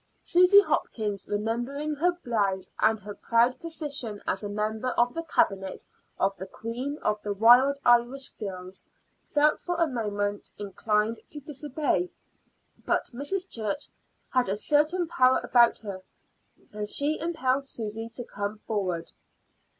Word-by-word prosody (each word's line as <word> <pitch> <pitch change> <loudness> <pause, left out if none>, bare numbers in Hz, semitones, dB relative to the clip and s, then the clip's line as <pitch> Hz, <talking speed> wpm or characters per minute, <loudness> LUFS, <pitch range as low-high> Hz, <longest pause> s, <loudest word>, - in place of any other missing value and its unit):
Susy 365 +3 +7
Hopkins, 210 - -2
remembering 240 +8 -2
her 345 +5 +2
blouse 200 -5 -1
and 220 0 +3
her 205 0 -8
proud 235 +4 +2
position 290 -10 -2
as 190 - -1
a 205 - -3
member 215 +3 -2
of 240 +1 +3
the 330 - -3
Cabinet 195 - 0 0.3
of 195 +1 +1
the 190 - -7
Queen 250 +6 -5
of 210 0 0
the 205 -1 -3
Wild 245 +6 +6
Irish 245 +3 +3
Girls, 185 -3 -7 0.5
felt 300 +1 +3
for 355 - -3
a 335 - +5
moment 205 -6 -2
inclined 210 +2 -1
to 295 - -8
disobey; 285 - -1 0.7
but - - 0
Mrs. 360 +9 -2
Church 225 - -3 0.4
had 255 -5 +2
a 200 - 0
certain 300 - +2
power 260 -6 +4
about 240 -1 +5
her, 200 -4 -7 0.7
and 210 0 -4
she 290 +6 +2
impelled 275 -5 0
Susy 225 -2 -4
to 245 - -3
come 205 -1 -4
forward. 185 -6 -2
235 Hz, 140 wpm, -27 LUFS, 205-285 Hz, 0.7 s, Susy